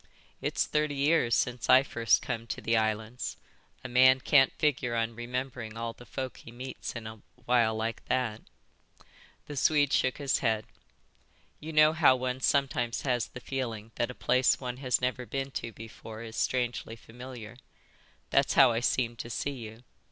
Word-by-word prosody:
"It's -, -, 0 dB
thirty 150 Hz, -1 st, 0 dB
years 140 Hz, -5 st, +3 dB
since 125 Hz, -1 st, -1 dB
I 130 Hz, -, +8 dB
first 120 Hz, -4 st, +2 dB
come 115 Hz, -2 st, -4 dB
to -, -, -4 dB
the 115 Hz, -, 0 dB
islands. 110 Hz, +2 st, -1 dB, 0.5 s
A -, -, -4 dB
man 130 Hz, +1 st, +6 dB
can't 135 Hz, 0 st, +4 dB
figure 130 Hz, -5 st, 0 dB
on 115 Hz, 0 st, 0 dB
remembering 120 Hz, -1 st, -5 dB
all 115 Hz, 0 st, -3 dB
the 120 Hz, -, -15 dB
folk 130 Hz, -2 st, -5 dB
he 115 Hz, -, -12 dB
meets 130 Hz, +2 st, -7 dB
in 115 Hz, -1 st, -6 dB
a 110 Hz, -1 st, -9 dB, 0.2 s
while 120 Hz, -3 st, +3 dB
like 110 Hz, 0 st, -3 dB
that." 120 Hz, -4 st, -1 dB, 1.0 s
The 145 Hz, -, -7 dB
Swede 145 Hz, 0 st, +3 dB
shook 130 Hz, -, +2 dB
his 140 Hz, -1 st, 0 dB
head. 110 Hz, -3 st, 0 dB, 0.9 s
"You 160 Hz, -, -7 dB
know 155 Hz, 0 st, +5 dB
how 155 Hz, -5 st, +5 dB
one 130 Hz, 0 st, -3 dB
sometimes 130 Hz, -4 st, +1 dB
has 125 Hz, -4 st, 0 dB
the -, -, -10 dB
feeling 115 Hz, -5 st, -4 dB
that 120 Hz, -, -1 dB
a 125 Hz, -, -7 dB
place 130 Hz, +1 st, +2 dB
one 125 Hz, -2 st, -5 dB
has 130 Hz, -2 st, +1 dB
never 125 Hz, 0 st, -2 dB
been 135 Hz, 0 st, -3 dB
to 115 Hz, -, -4 dB
before 110 Hz, 0 st, -10 dB
is 110 Hz, -1 st, -9 dB
strangely 120 Hz, -2 st, -1 dB
familiar. 120 Hz, 0 st, -10 dB, 0.8 s
That's -, -, +3 dB
how -, -, +7 dB
I 115 Hz, -, 0 dB
seem 120 Hz, -1 st, 0 dB
to 115 Hz, -, -6 dB
see 140 Hz, +4 st, -2 dB
you." 115 Hz, -3 st, -9 dB
125 Hz, 175 wpm, -29 LUFS, 115-130 Hz, 1.0 s, I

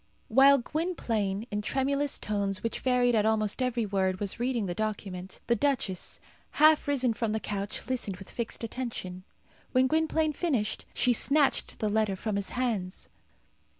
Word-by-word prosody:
While 270 Hz, +4 st, +7 dB
Gwynplaine, 235 Hz, -, -2 dB
in 205 Hz, 0 st, -1 dB
tremulous 275 Hz, +5 st, 0 dB
tones 200 Hz, -2 st, -2 dB
which 230 Hz, -, -2 dB
varied 250 Hz, -1 st, +2 dB
at 215 Hz, -2 st, +3 dB
almost 215 Hz, +1 st, +1 dB
every 245 Hz, -3 st, 0 dB
word, 190 Hz, -2 st, 0 dB
was 205 Hz, +2 st, -3 dB
reading 240 Hz, -3 st, 0 dB
the 175 Hz, -, -2 dB
document, 195 Hz, -3 st, -4 dB
the 235 Hz, -, +2 dB
duchess, 250 Hz, -10 st, -1 dB, 0.3 s
half 310 Hz, 0 st, +5 dB
risen 260 Hz, -4 st, +2 dB
from 225 Hz, -1 st, -2 dB
the 220 Hz, -, 0 dB
couch, 200 Hz, -1 st, -4 dB
listened 240 Hz, -7 st, -2 dB
with 195 Hz, -, -11 dB
fixed 235 Hz, 0 st, -4 dB
attention. 220 Hz, -7 st, -5 dB, 0.5 s
When 255 Hz, 0 st, +4 dB
Gwynplaine 315 Hz, +2 st, +1 dB
finished, 270 Hz, -10 st, -1 dB
she 250 Hz, -, +3 dB
snatched 280 Hz, +4 st, +2 dB
the 215 Hz, -, -1 dB
letter 210 Hz, -2 st, +1 dB
from 210 Hz, +2 st, -3 dB
his 200 Hz, -1 st, -2 dB
hands. 215 Hz, -7 st, -2 dB
230 Hz, 155 wpm, -29 LUFS, 200-260 Hz, 0.5 s, While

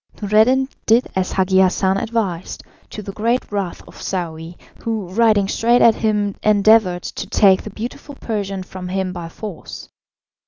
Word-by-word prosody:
Noureddin 220 Hz, +6 st, +3 dB, 0.2 s
did 230 Hz, +3 st, +4 dB
as 190 Hz, -1 st, -1 dB
Hagi 190 Hz, 0 st, +2 dB
Hassan 190 Hz, +1 st, +2 dB
advised, 195 Hz, -6 st, -3 dB, 0.3 s
to 210 Hz, -, -8 dB
the 195 Hz, -, -6 dB
great 230 Hz, +5 st, -1 dB
wrath 200 Hz, -4 st, -3 dB
of -, -, -13 dB
Saouy, 170 Hz, -2 st, -4 dB, 0.3 s
who 220 Hz, -5 st, -3 dB
riding 210 Hz, 0 st, +3 dB
straight 235 Hz, +4 st, +2 dB
at 230 Hz, -, +7 dB
him 210 Hz, -2 st, 0 dB
endeavoured 210 Hz, -3 st, +4 dB
to -, -, -6 dB
take 195 Hz, -2 st, +4 dB
the -, -, -8 dB
beautiful 245 Hz, +7 st, -7 dB
Persian 200 Hz, -6 st, -4 dB
from 185 Hz, 0 st, -8 dB
him 185 Hz, 0 st, -2 dB
by 170 Hz, -2 st, -7 dB
force. 200 Hz, 0 st, -9 dB
200 Hz, 155 wpm, -19 LUFS, 185-220 Hz, 0.3 s, at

